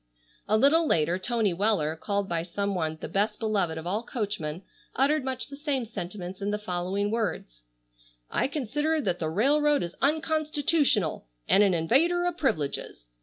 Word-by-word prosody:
A 215 - +3
little 305 +7 +5
later 165 - +2
Tony 220 -1 +1
Weller, 180 -5 +1
called 200 +3 -2
by 170 -2 -1
some 200 +4 -2
one 160 -3 -2
"the - - -5
best 200 +6 0
beloved 200 -7 0
of 160 - -6
all 200 +5 -1
coachmen," 200 -9 -4 0.3
uttered 285 +3 +2
much 260 -1 -3
the 280 - -8
same 280 -4 -2
sentiments 185 -2 -7
in 200 - -1
the 210 - 0
following 195 +1 -2
words: 205 - -3 0.7
"I - - +1
consider 295 +3 -1
that 180 - -1
the 160 - -1
railroad 290 - +3
is 170 0 -5
unconstitutional 295 - +1 0.2
and 200 - +5
an 195 -3 +4
invader 320 - +2
o' 355 - 0
privileges. 150 - -2
210 Hz, 165 wpm, -27 LUFS, 175-280 Hz, 0.7 s, little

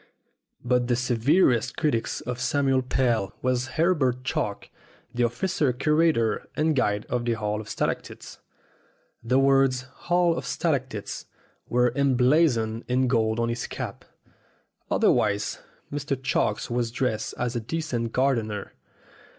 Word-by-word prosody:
But 125 0 +2
the 125 - +2
severest 125 +2 +2
critic 140 -8 +1 0.2
of 125 0 -4
Samuel 135 -1 +2
Pell 120 -6 0
was 130 0 +1
Herbert 145 -7 +2
Chalk, 105 -5 -3 0.4
the 120 - -1
official 135 +5 +1
curator 150 -5 +1
and 155 0 +1
guide 105 -5 +1
of 120 0 -1
the 120 -1 +1
Hall 105 -1 -2
of 110 - -11
Stalactites. - - -4 0.8
The 125 +3 +2
words, 135 -1 +4 0.3
"Hall 175 -1 +3
of - - -5
Stalactites," 130 -10 -2 0.4
were 125 0 +2
emblazoned 125 -4 +2
in 130 +1 +2
gold 110 -2 +1
on 115 0 +1
his 120 0 -3
cap. - - -6 0.9
Otherwise 100 0 +2 0.3
Mr. 145 -1 -2
Chalk 135 +2 0
was 120 -1 0
dressed 115 -2 -2
as 125 0 -2
a - - 0
decent 120 -3 -3
gardener. 115 -6 -1
125 Hz, 125 wpm, -26 LUFS, 115-140 Hz, 0.9 s, words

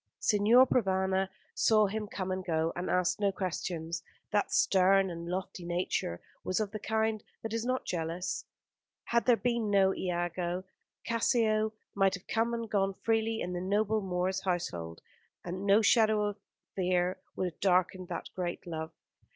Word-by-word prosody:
Signor 220 +5 +5
Provana 190 -5 +1 0.2
saw 215 -1 +4
him 210 +1 -3
come 190 -2 -4
and 185 0 -2
go, 165 -2 0
and 175 +1 -3
asked 180 +2 +1
no 200 -1 +2
questions. 175 -2 -3 0.3
That 205 0 +1
stern 190 0 +4
and 170 0 -6
lofty 185 0 -4
nature 175 - -2 0.2
was 185 - 0
of 210 -2 -1
the 215 - -5
kind 220 0 0 0.2
that 225 0 -4
is 230 0 -1
not 255 +1 0
easily 175 - -2
jealous. 175 +3 -3 0.6
Had 235 +1 0
there 245 -2 +6
been 235 -3 0
no 195 -1 +4
Iago, 175 0 -2 0.4
Cassio 220 -2 +2 0.2
might 195 -1 +3
have 180 - -11
come 230 +1 0
and 230 -1 -4
gone 195 -2 0
freely 225 +1 0
in 180 - -3
the 175 - -3
noble 210 +3 +1
Moor's 185 0 -1
household, 85 - -3 0.4
and 185 +3 -4
no 205 +3 +5
shadow 215 -1 +4
of 205 0 -3 0.4
fear 180 -1 +1 0.2
would 185 - -1
have - - -35
darkened 185 -1 +2
that - - -5
great 175 -2 -3
love. 160 -2 -4
190 Hz, 165 wpm, -31 LUFS, 180-215 Hz, 0.6 s, there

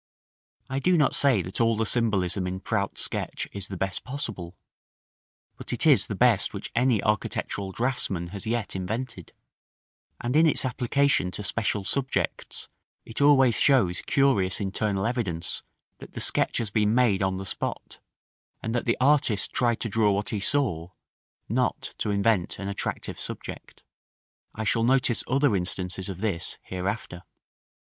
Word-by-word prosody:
I 135 +1 -2
do 180 +5 +3
not 150 -4 +3
say 130 -10 +3
that 95 +5 -3
all 115 -1 +3
the 110 - +1
symbolism 100 -5 +1
in 95 +1 -4
Prout's 100 -1 -1
Sketch - - -3
is 100 -2 -2
the 95 - -6
best 95 +1 -2
possible; 110 -10 -6 1.0
but - - -8
it - - +1
is - - +5
the - - -3
best - - +3
which - - -6
any 120 -3 +2
architectural 100 -2 -1
draughtsman 110 -7 -1
has 100 +4 -6
yet 115 -3 -2
invented; 105 0 -4 0.9
and 120 +3 -2
in 160 +1 +6
its 150 - +1
application 130 -4 +1
to 105 - -6
special 105 0 -1
subjects 130 +6 -2 0.4
it 115 - -5
always 135 -4 +5
shows 110 -11 +3
curious 130 -10 +2
internal 100 0 -1
evidence 100 -9 -2 0.4
that - - -12
the - - -5
sketch - - +2
has 110 -4 -2
been 105 +1 +2
made 120 -6 +3
on 95 -1 0
the 95 - -5
spot, - - -4 0.6
and 115 - -2
that 120 - -1
the 115 - +1
artist 130 -6 +3
tried 120 -2 +1
to - - -1
draw 105 -1 +2
what 100 +2 -2
he 105 - -2
saw, 100 - 0 0.6
not - - -1
to - - -1
invent 100 -2 +1
an 100 - -5
attractive 100 0 -4
subject. - - -7 0.7
I 110 - -3
shall 115 +1 +1
notice 125 -1 +2
other 135 -3 +2
instances 90 +1 -2
of 95 -1 -6
this 95 -6 -2
hereafter. 95 -1 -4
110 Hz, 155 wpm, -26 LUFS, 95-125 Hz, 1.0 s, in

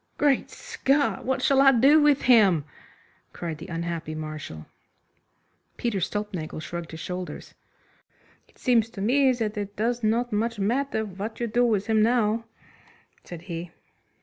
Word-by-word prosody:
"Great 285 -3 +2
Scott! 280 +1 -1
What 260 +1 -1
shall 275 -1 +4
I 275 0 +7
do 275 +5 +5
with 295 -2 +3
him?" 200 - +5 0.7
cried 165 -3 -5
the 165 - -9
unhappy 165 -2 -4
Marshal. 155 - -7 1.1
Peter 230 -5 -1
Stulpnagel 185 -4 -4
shrugged 170 +1 -6
his 160 - -8
shoulders. 180 +2 -6 0.9
"It - - -28
seems 230 -3 +2
to 225 - -10
me 260 +5 +3
that 225 -3 -3
it 205 0 -5
does 235 +2 -1
not 230 +2 +1
much 230 +2 -1
matter 220 +3 0
what 205 +3 -7
you 240 - 0
do 235 +2 +1
with 215 -5 +1
him 220 -1 +2
now," 225 -1 +2 0.8
said 175 -1 -9
he. 170 -1 -6
215 Hz, 150 wpm, -25 LUFS, 175-245 Hz, 1.1 s, I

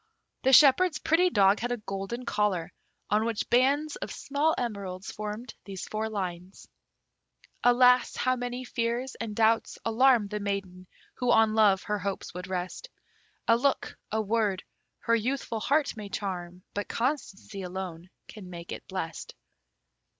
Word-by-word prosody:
The 265 - +3
shepherd's 300 +5 +6
pretty 330 +4 +3
dog 200 - +4
had 245 +1 -2
a 245 - 0
golden 210 +4 -5
collar, 200 -5 0 0.4
on 210 +1 +3
which 230 -2 -2
bands 280 +5 +3
of - - -6
small 290 +3 0
emeralds 200 -5 -4
formed 215 +3 -6
these 195 -2 -6
four 220 +1 -2
lines: 185 -2 -5 1.0
Alas! 250 +1 +5
how 255 0 +1
many 245 0 -4
fears 240 +2 -2
and 220 -2 -5
doubts 225 +1 +2
alarm 235 -1 +4
The 210 0 -3
maiden 195 -3 -4 0.3
who 250 -1 +1
on 220 -1 +5
love 205 -3 +4
her 210 0 -2
hopes 200 0 -4
would 180 +1 -6
rest; 185 - -4 0.6
A 230 - +6
look, 270 +3 0 0.2
a 220 - 0
word, 210 -3 0 0.4
her 230 - +2
youthful 235 0 -2
heart 290 +5 +1
may 210 -2 -7
charm, 180 -3 -5
But 205 - -3
constancy 230 -6 -3
alone 180 -2 -6 0.2
can 200 -4 -10
make 170 -1 -8
it - - -7
blest. 185 -4 -5
215 Hz, 150 wpm, -28 LUFS, 195-250 Hz, 1.0 s, shepherd's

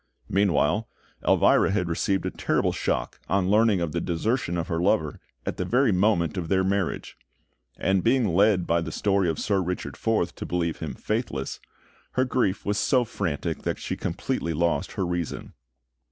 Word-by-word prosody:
Meanwhile, 100 +1 +2 0.4
Elvira - - +5
had 95 -3 0
received 95 +3 0
a - - -1
terrible - - 0
shock - - -2
on 95 0 +2
learning 105 -3 +4
of 85 -3 -1
the 85 - -2
desertion 90 +2 -1
of 85 - -2
her 80 - -1
lover 90 -5 +1 0.3
at - - -3
the - - -1
very 125 -1 +3
moment 90 -4 +2
of 85 -3 -2
their 95 -1 +3
marriage; 95 -1 -1 0.6
and 95 0 +1
being 120 -2 +3
led 95 +1 +3
by 85 0 +2
the - - -4
story 100 -3 +1
of 80 - -1
Sir 100 -2 +1
Richard 90 0 -4
Forth 110 -6 0
to - - -5
believe 85 -2 -1
him - - -5
faithless, 65 - -3 0.5
her 130 - +2
grief 120 -7 0
was 105 0 0
so 125 -3 +3
frantic 80 -9 -3
that - - -2
she - - -4
completely 85 - -2
lost 85 +2 0
her 95 - -1
reason. 85 -2 -4
95 Hz, 175 wpm, -26 LUFS, 85-105 Hz, 0.6 s, Elvira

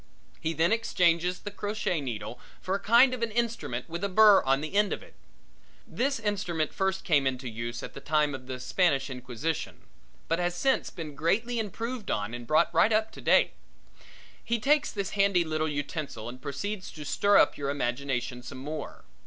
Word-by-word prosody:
He 160 - -1
then 165 +3 +2
exchanges 180 -5 +2
the 205 - -6
crochet 205 -5 -2
needle 120 -2 -5 0.2
for 185 - -3
a 200 - 0
kind 240 +5 +5
of 250 - -4
an 230 - 0
instrument 225 - -2
with 170 +3 -5
a 200 - 0
burr 210 +1 +7
on 135 +1 +1
the 155 - -5
end 205 0 +3
of - - -6
it. - - -17 0.7
This 275 +1 -1
instrument 195 -7 -1
first 190 0 -1
came 145 -5 +3
into 130 0 -2
use 115 +1 -5
at - - -7
the - - -8
time 150 0 +1
of 130 -1 -8
the 130 -1 -5
Spanish 140 -3 +1
Inquisition 130 +5 -4 0.5
but 165 - 0
has 175 0 0
since 265 +9 +1
been 160 -5 -7
greatly 220 - 0
improved 225 +2 -4
on 105 +2 -1
and 120 -1 -7
brought 155 +5 +3
right 170 +7 +4
up 220 0 +2
to - - -11
date. - - +4 0.9
He 235 - 0
takes 290 +7 +2
this 200 -3 -3
handy 195 -3 +3
little 155 -1 -1
utensil 145 -5 -4
and 125 +2 -8
proceeds 185 +8 -4
to 150 -2 -8
stir 200 +7 +3
up - - +5
your 140 -1 -3
imagination 125 -2 -2
some 130 +2 -9
more. 150 +4 -7
170 Hz, 190 wpm, -28 LUFS, 140-205 Hz, 0.9 s, burr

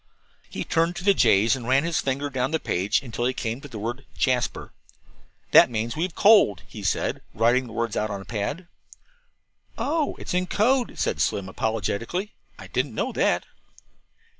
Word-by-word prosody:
He - - -4
turned 165 +2 +1
to - - -6
the 200 +1 +5
J's 115 - +4
and 120 -3 -7
ran 135 +2 +3
his 165 -1 0
finger 140 +2 -2
down 130 0 -1
the 160 +1 0
page 100 +5 0
until 120 -1 -3
he 130 +1 0
came 115 +2 -3
to 145 - -9
the 120 -5 -9
word 120 +6 -5
"JASPER." 125 -2 -1 0.8
"That - - +8
means 115 0 -2
'We 160 - -3
have 180 -2 -2
coaled,'" 200 - +5
he 110 - -9
said, 95 - -1
writing 120 +4 +2
the 115 - -10
words 115 -2 -2
out 110 - -1
on 100 - -3
the 95 - -10
pad. 130 - -4 1.1
"Oh, 305 0 -1
it's - - -6
in 180 0 0
code," 245 +6 +1
said - - -1
Slim 95 -1 0
apologetically; 115 - -2 0.2
"I - - -10
didn't 130 -2 -2
know - - -1
that." - - +1
125 Hz, 185 wpm, -25 LUFS, 110-165 Hz, 1.1 s, That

